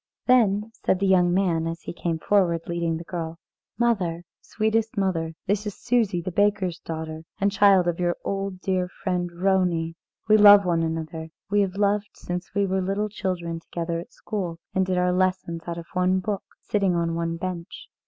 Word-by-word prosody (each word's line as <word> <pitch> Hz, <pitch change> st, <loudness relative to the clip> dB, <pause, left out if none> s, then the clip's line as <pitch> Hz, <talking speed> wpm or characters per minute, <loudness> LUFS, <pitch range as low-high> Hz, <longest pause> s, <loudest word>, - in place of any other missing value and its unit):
Then 220 Hz, -4 st, +3 dB
said 190 Hz, -, +3 dB
the 195 Hz, -, 0 dB
young 180 Hz, -2 st, +4 dB
man, 175 Hz, -3 st, +1 dB
as 165 Hz, 0 st, -4 dB
he -, -, -6 dB
came 170 Hz, -1 st, -2 dB
forward 170 Hz, -2 st, +2 dB
leading 170 Hz, -1 st, -1 dB
the 165 Hz, -, -7 dB
girl: 165 Hz, -2 st, -5 dB, 0.4 s
"Mother, 185 Hz, -8 st, +1 dB, 0.2 s
sweetest 220 Hz, +1 st, -1 dB
mother, 165 Hz, -5 st, 0 dB
this 205 Hz, +2 st, 0 dB
is 205 Hz, -, -4 dB
Susie, 215 Hz, -8 st, +1 dB
the 185 Hz, -, -3 dB
baker's 195 Hz, -2 st, +1 dB
daughter, 160 Hz, -1 st, -5 dB, 0.2 s
and 200 Hz, 0 st, +2 dB
child 195 Hz, -3 st, +5 dB
of 175 Hz, 0 st, -1 dB
your 175 Hz, -1 st, +1 dB
old 195 Hz, 0 st, -2 dB
and 185 Hz, -, -15 dB
dear 185 Hz, -2 st, 0 dB, 0.2 s
friend 180 Hz, -2 st, 0 dB
Vronie. 175 Hz, -2 st, +1 dB, 0.3 s
We 215 Hz, 0 st, +6 dB
love 205 Hz, -1 st, +9 dB
one 170 Hz, -2 st, +2 dB
another; 160 Hz, 0 st, -3 dB, 0.2 s
we 205 Hz, 0 st, +4 dB
have 195 Hz, -1 st, -1 dB
loved 205 Hz, 0 st, +1 dB
since 180 Hz, +2 st, -6 dB
we 200 Hz, 0 st, +3 dB
were 190 Hz, 0 st, 0 dB
little 200 Hz, +3 st, -1 dB
children 175 Hz, -5 st, -3 dB
together 165 Hz, 0 st, -4 dB
at 170 Hz, -, -10 dB
school, 180 Hz, -6 st, -4 dB, 0.2 s
and 190 Hz, 0 st, +1 dB
did 185 Hz, -1 st, 0 dB
our 180 Hz, 0 st, +2 dB
lessons 185 Hz, -2 st, 0 dB
out 170 Hz, 0 st, -3 dB
of 170 Hz, -, -7 dB
one 185 Hz, +1 st, +2 dB
book, 200 Hz, +1 st, -2 dB, 0.2 s
sitting 195 Hz, -4 st, +1 dB
on 170 Hz, -1 st, 0 dB
one 165 Hz, 0 st, -2 dB
bench. 185 Hz, -, -6 dB
185 Hz, 190 wpm, -25 LUFS, 170-200 Hz, 0.4 s, love